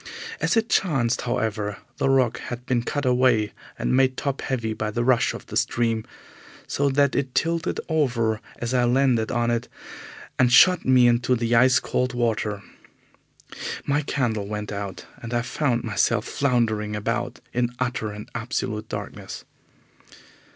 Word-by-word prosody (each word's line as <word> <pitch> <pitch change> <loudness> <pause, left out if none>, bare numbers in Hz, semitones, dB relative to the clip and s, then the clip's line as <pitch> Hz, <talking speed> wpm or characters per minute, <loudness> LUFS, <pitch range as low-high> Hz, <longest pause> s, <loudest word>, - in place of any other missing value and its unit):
As - - +1
it 225 0 +2
chanced, 135 - +1
however, 105 -2 -1 0.2
the 135 - +1
rock 125 -4 +2
had 120 0 -7
been 125 -2 +1
cut 145 +4 -3
away 125 -4 +3 0.3
and - - 0
made 130 -1 +3
top 140 -2 -2
heavy 115 -4 -2
by 110 0 -3
the 120 +3 -1
rush 120 -1 +2
of - - -9
the - - -8
stream, 115 -2 0 0.6
so 140 0 0
that 140 0 +2
it 135 -2 -2
tilted 165 0 0
over 120 -9 +1 0.2
as 120 +1 -3
I 125 -1 +3
landed 120 -3 +2
on 120 0 +1
it 120 +1 -1 0.7
and 125 -1 +4
shot 180 +8 +6
me 130 -1 +5
into 120 +1 +2
the 115 0 -1
ice 125 +2 +5
cold 125 0 -1
water. 110 -4 -1 1.2
My 145 +1 +1
candle 115 -8 -1
went 105 0 -4
out, 100 -2 -5 0.2
and 120 +1 -4
I 120 - +1
found 120 -1 0
myself 110 +1 +1
floundering 110 -6 0
about 120 +3 -2
in 120 0 0
utter 125 -3 -2
and 105 0 -8
absolute 110 -2 -3
darkness. - - -7
120 Hz, 155 wpm, -24 LUFS, 110-130 Hz, 1.2 s, shot